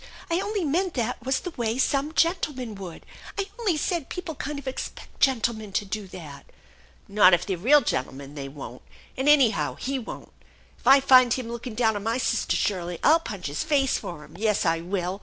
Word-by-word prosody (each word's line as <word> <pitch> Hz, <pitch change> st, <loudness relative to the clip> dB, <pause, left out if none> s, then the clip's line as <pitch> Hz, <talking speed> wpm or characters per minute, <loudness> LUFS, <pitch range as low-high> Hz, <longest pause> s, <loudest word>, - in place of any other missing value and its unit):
I 335 Hz, -, +2 dB
only 405 Hz, 0 st, -2 dB
meant 350 Hz, +4 st, 0 dB
that 245 Hz, -1 st, -2 dB
was 265 Hz, +1 st, 0 dB
the 360 Hz, -, -5 dB
way 235 Hz, -4 st, -2 dB
some 280 Hz, +3 st, 0 dB
gentlemen 295 Hz, -, 0 dB
would. 190 Hz, -4 st, -9 dB, 0.3 s
I 395 Hz, -, 0 dB
only 395 Hz, -9 st, +1 dB
said 335 Hz, -1 st, -2 dB
people 360 Hz, -3 st, -5 dB
kind 295 Hz, 0 st, -5 dB
of 280 Hz, -1 st, -8 dB
expect 260 Hz, -, -6 dB
gentlemen 230 Hz, -6 st, +1 dB
to 205 Hz, -, 0 dB
do 200 Hz, +1 st, -5 dB
that." 155 Hz, -6 st, -10 dB, 0.3 s
" 65 Hz, +2 st, -30 dB
Not 195 Hz, -3 st, +6 dB
if 175 Hz, -, -4 dB
they're 195 Hz, -, -1 dB
real 265 Hz, -, +5 dB
gentlemen, 135 Hz, -, -3 dB
they 140 Hz, -2 st, -6 dB
won't. 135 Hz, -3 st, -9 dB, 0.3 s
And 265 Hz, +3 st, +1 dB
anyhow 265 Hz, -8 st, +4 dB
he 270 Hz, +1 st, -3 dB
won't. 230 Hz, -, -9 dB, 0.5 s
If -, -, -9 dB
I 275 Hz, +1 st, +8 dB
find 255 Hz, -3 st, +6 dB
him 250 Hz, -3 st, -5 dB
looking 235 Hz, 0 st, -6 dB
down 220 Hz, -2 st, +2 dB
on 205 Hz, -, -3 dB
my 225 Hz, +3 st, -1 dB
sister 230 Hz, -3 st, 0 dB
Shirley, 175 Hz, -3 st, -1 dB
I'll 320 Hz, +3 st, +6 dB
punch 200 Hz, -, -7 dB
his 145 Hz, +1 st, -2 dB
face 285 Hz, -4 st, +2 dB
for 170 Hz, -4 st, -7 dB
him. 150 Hz, +2 st, -16 dB
Yes, 215 Hz, -3 st, +1 dB
I 165 Hz, 0 st, +2 dB
will! 180 Hz, +2 st, -3 dB
235 Hz, 205 wpm, -25 LUFS, 185-280 Hz, 0.5 s, I